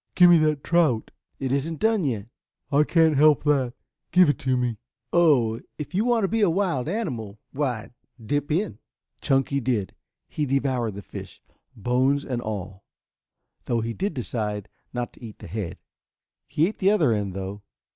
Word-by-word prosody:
"Give 180 -1 +8
me 170 - +7
that 155 -2 +1
trout." 160 -10 +2 0.3
"It 130 -2 -3
isn't 145 +4 -1
done 220 -3 +2
yet." 115 -7 -2 0.4
"I 145 +1 +5
can't 160 -2 +4
help 150 +1 +5
that. 135 -5 +1 0.4
Give 180 -3 +6
it 145 - +1
to 130 -3 +1
me." 120 -3 -1 0.3
"Oh, 130 -10 +4 0.2
if 150 +2 -6
you 205 +5 +1
want 240 -3 +2
to - - +3
be 225 +3 0
a 200 - +5
wild 170 -8 0
animal, 125 - -3
why 130 -6 -2 0.3
dip 145 +7 -2
in." 170 - -1 0.4
Chunky 135 +1 +1
did. 120 -7 -1 0.3
He 150 -2 -2
devoured 130 -5 0
the 100 - -7
fish, - - -9 0.4
bones 130 +6 +1
and 125 -2 -2
all, 100 -3 -5 0.8
though 115 -1 0
he 115 +1 -3
did 200 - -2
decide 105 -5 -3 0.2
not 120 -1 -4
to - - -17
eat 110 -3 -9
the - - -11
head. 95 -1 -5 0.7
He 155 - +2
ate 215 - -6
the 190 - +4
other 160 - +3
end, 100 -3 -2
though. 95 +1 -5
135 Hz, 175 wpm, -25 LUFS, 115-160 Hz, 0.8 s, Give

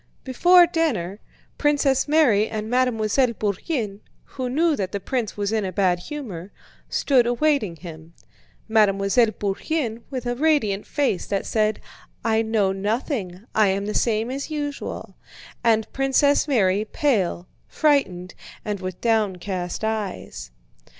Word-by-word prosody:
Before 350 +7 +6
dinner, 240 - -1 0.4
Princess 285 -3 +2
Mary 260 -9 +3
and 215 -1 -4
Mademoiselle 250 0 +2
Bourienne, 210 - -2 0.2
who 255 -2 -5
knew 315 +4 +2
that 190 -4 -4
the 200 - -1
prince 230 0 -3
was 205 0 -1
in 220 -1 0
a 190 - -3
bad 180 -1 +1
humor, 205 - -7 0.4
stood 255 -4 +2
awaiting 245 - +1
him; 165 -1 -11 0.5
Mademoiselle 215 +1 +3
Bourienne 225 +4 -3
with 255 -3 -5
a 245 - 0
radiant 245 -8 +1
face 275 -11 -1
that 200 -1 -2
said: 215 -1 0 0.5
"I 225 -1 +3
know 220 -3 +1
nothing, 205 - -3
I 215 -1 +4
am 195 +1 0
the 210 - -3
same 225 +1 0
as 275 +3 -4
usual," 290 -2 -5 0.5
and 220 -2 +2
Princess 270 +2 +2
Mary 205 -7 +2
pale, 210 - 0 0.2
frightened, 190 - +1 0.3
and 210 -2 -2
with 185 -1 -6
downcast 190 -5 -1
eyes. 185 - -4
220 Hz, 130 wpm, -23 LUFS, 195-270 Hz, 0.5 s, Before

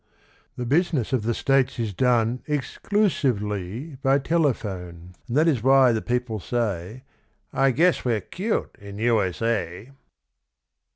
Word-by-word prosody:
The 125 - -4
business 145 - +1
of 130 - +2
the 115 +2 -1
States 135 -1 +1
is 110 -4 -2
done 120 +1 +1
Ex 145 -4 -3
clu 210 +1 +2
sive 135 - 0
ly 105 - -5
by 135 0 +3
telephone; 100 - -2
And 125 +2 -1
that 155 +2 +4
is 140 -9 +2
why 135 0 +5
the 110 -1 0
people 125 -3 -2
say, 110 +1 -3 0.5
"I 135 0 +3
guess 170 +7 +2
we're 115 -4 0
'cute 195 - -3
in 100 0 -9
U. 115 0 +2
S. 95 +3 -3
A." 105 0 -2
120 Hz, 155 wpm, -24 LUFS, 105-135 Hz, 0.5 s, why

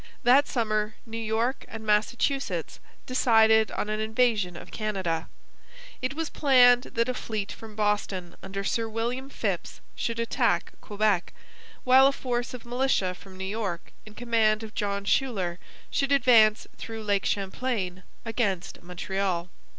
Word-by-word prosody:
That 260 +4 +5
summer 215 -3 -1
New 225 0 -6
York 225 +4 -1
and 225 -1 -8
Massachusetts 235 +6 0 0.3
decided 220 -3 +4
on - - -3
an 215 0 -2
invasion 220 -5 +1
of - - -11
Canada. 190 -7 -2 0.7
It 255 +2 -2
was 325 0 -3
planned 250 -3 +5
that 230 +1 +2
a 255 - 0
fleet 215 -4 -4
from 220 -2 -10
Boston 205 -4 -1
under 195 +1 -5
Sir 225 +3 -1
William 240 +4 -3
Phips - - -3 0.2
should 230 -1 -3
attack 230 - 0
Quebec, 205 -3 0 0.5
while 260 +1 +7
a - - +3
force 245 -2 -3
of 240 - -11
militia 245 -6 +1
from 185 +1 -14
New 190 - -5
York 195 -4 -4
in 215 0 -14
command 225 -2 +2
of 220 0 -8
John 200 -1 -2
Schuyler 195 -8 0 0.3
should 275 0 0
advance 230 -6 +5
through 225 -1 -6
Lake 205 -2 +1
Champlain 195 -2 -2 0.2
against 210 -6 -2
Montreal. 180 0 -3
220 Hz, 145 wpm, -27 LUFS, 200-245 Hz, 0.7 s, while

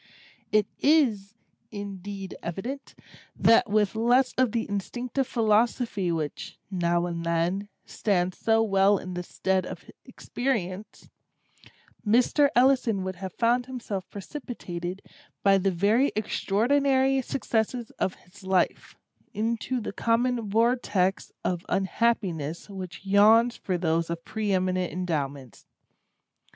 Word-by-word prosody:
It 215 -1 +4
is, 225 -10 +2 0.3
indeed 200 -2 -7
evident, 240 +11 -6 0.4
that 230 0 +4
with 210 -1 +2
less 245 +3 +3
of 255 -3 +2
the 230 0 -1
instinctive 245 +6 -3
philosophy 220 -4 +1
which, 165 +5 -4
now 175 -1 +1
and 170 -1 -4
then, 170 +4 -1 0.2
stands 185 -3 -1
so 225 0 +3
well 195 -1 +4
in 185 0 -7
the 180 - -3
stead 190 +1 -1
of - - -9
experience, 215 -6 -4 1.0
Mr. 250 +6 +3
Ellison 245 -6 +3
would 185 -1 -4
have 190 -1 -6
found 245 +1 +1
himself 225 -7 -5
precipitated, 190 - -6 0.4
by 195 -1 +5
the 195 +1 +1
very 205 +9 +2
extraordinary 265 +6 +2
successes 235 -2 -2
of 185 - 0
his 190 +2 -19
life, 190 -1 0 0.4
into 230 +3 -1
the 210 - -5
common 230 -1 0
vortex 215 -4 +1
of 175 -1 -1
Unhappiness 190 -6 -1
which 190 0 -8
yawns 220 +4 +5
for 185 -2 -2
those 165 -1 0
of 170 0 -5
preeminent 185 -4 -1
endowments. 140 - -4
205 Hz, 115 wpm, -26 LUFS, 185-235 Hz, 1.0 s, by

